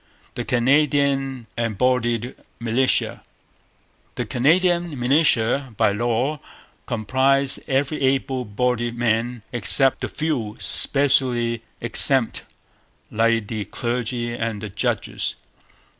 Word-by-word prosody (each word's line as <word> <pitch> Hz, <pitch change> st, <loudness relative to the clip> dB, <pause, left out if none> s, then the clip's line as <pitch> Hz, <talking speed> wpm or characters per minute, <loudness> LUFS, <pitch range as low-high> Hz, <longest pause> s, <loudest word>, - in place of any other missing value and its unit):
The 120 Hz, -, -4 dB
Canadian 135 Hz, 0 st, +1 dB
Embodied 120 Hz, +1 st, 0 dB, 0.3 s
Militia. 115 Hz, +3 st, +1 dB, 0.9 s
The -, -, -3 dB
Canadian 170 Hz, +3 st, +1 dB
militia 125 Hz, -2 st, +2 dB
by -, -, +3 dB
law 120 Hz, +7 st, -1 dB, 0.5 s
comprised 130 Hz, +4 st, +2 dB
every 140 Hz, +3 st, -1 dB
able 135 Hz, -1 st, 0 dB
bodied 120 Hz, +2 st, -1 dB
man 115 Hz, 0 st, -1 dB
except 130 Hz, +3 st, +2 dB
the -, -, -2 dB
few 125 Hz, -9 st, -3 dB
specially 125 Hz, -4 st, +2 dB, 0.2 s
exempt, 120 Hz, +2 st, +1 dB, 0.7 s
like 115 Hz, 0 st, +1 dB
the 110 Hz, -2 st, -4 dB
clergy 120 Hz, +1 st, -3 dB
and 115 Hz, -2 st, -3 dB
the 110 Hz, -, -5 dB
judges. -, -, -2 dB
125 Hz, 95 wpm, -22 LUFS, 115-135 Hz, 0.9 s, by